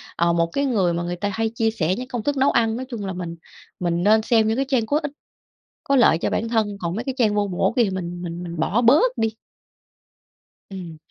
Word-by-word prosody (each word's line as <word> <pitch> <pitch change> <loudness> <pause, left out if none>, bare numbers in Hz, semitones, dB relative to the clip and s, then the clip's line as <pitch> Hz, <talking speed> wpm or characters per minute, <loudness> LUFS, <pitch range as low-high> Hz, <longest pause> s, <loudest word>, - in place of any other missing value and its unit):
ờ, 170 0 +2
một 170 0 +2
cái 280 - +1
người 195 -10 +1
mà 170 - -2
người 175 0 -3
ta 205 +3 -2
hay 225 +2 0
chia 225 -1 +1
sẻ 185 -4 0
những 250 - -5
công 245 -4 -4
thức 290 +2 -1
nấu 270 +1 +3
ăn. 225 -1 +2
Nói 260 - -5
chung 225 -6 -5
là 190 - -3
mình 175 -2 -5 0.4
mình 175 -1 0
nên 215 +2 +5
xem 220 -1 +3
những 220 - +1
cái 270 - +1
trang 250 -5 +2
có 290 +6 +1
ích, 290 - -3 0.7
có 275 - +1
lợi 240 -10 +5
cho - - -1
bản 230 +1 -1
thân, 215 -3 0
còn 170 +1 -2
mấy 225 - -3
cái 265 -1 -4
trang 220 -5 +2
vô 205 -1 +1
bổ 180 -2 0
kia 240 - +5
thì 210 - 0
mình 175 -2 -5
mình 175 0 -5
mình 170 -1 -6
bỏ 205 +9 +1
bớt 310 - +4
đi. 225 - +1 1.4
Ừm. 180 -5 -8
215 Hz, 255 wpm, -22 LUFS, 175-240 Hz, 1.4 s, nên